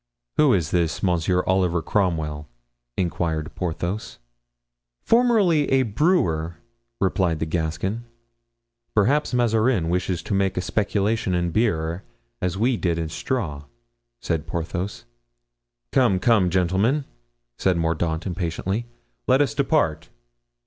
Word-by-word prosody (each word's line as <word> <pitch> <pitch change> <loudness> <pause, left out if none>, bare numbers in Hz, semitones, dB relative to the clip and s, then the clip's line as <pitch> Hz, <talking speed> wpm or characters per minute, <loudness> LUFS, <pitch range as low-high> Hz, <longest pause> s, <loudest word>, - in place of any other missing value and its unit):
"Who 150 -3 +5
is 80 -5 -1
this 85 0 0
Monsieur 90 0 +2
Oliver 90 -3 +1
Cromwell?" 80 -7 -1 0.5
inquired 80 -3 -1
Porthos. 90 +4 -3 0.9
"Formerly 215 - +3
a 135 0 +4
brewer," 100 - +1 0.4
replied 90 -3 +1
the 80 - -2
Gascon. 85 +7 -2 0.9
"Perhaps 135 +8 +2
Mazarin 115 -6 +2
wishes 90 -1 -1
to - - -3
make 95 -1 +1
a - - +1
speculation 100 +1 0
in 85 -1 0
beer, 85 -4 0 0.4
as 90 0 -1
we 120 +3 +2
did 85 -4 0
in 80 -1 -2
straw," 80 - -3 0.5
said 80 -3 -2
Porthos. 90 +2 -4 0.9
"Come, 120 -8 +3
come, 100 -2 +3
gentlemen," 95 - +1 0.5
said 95 -2 +2
Mordaunt, 80 0 -1
impatiently, 95 +5 -2 0.4
"let 130 +1 +5
us 145 -5 +2
depart." 130 - +1
90 Hz, 115 wpm, -23 LUFS, 85-115 Hz, 0.9 s, Who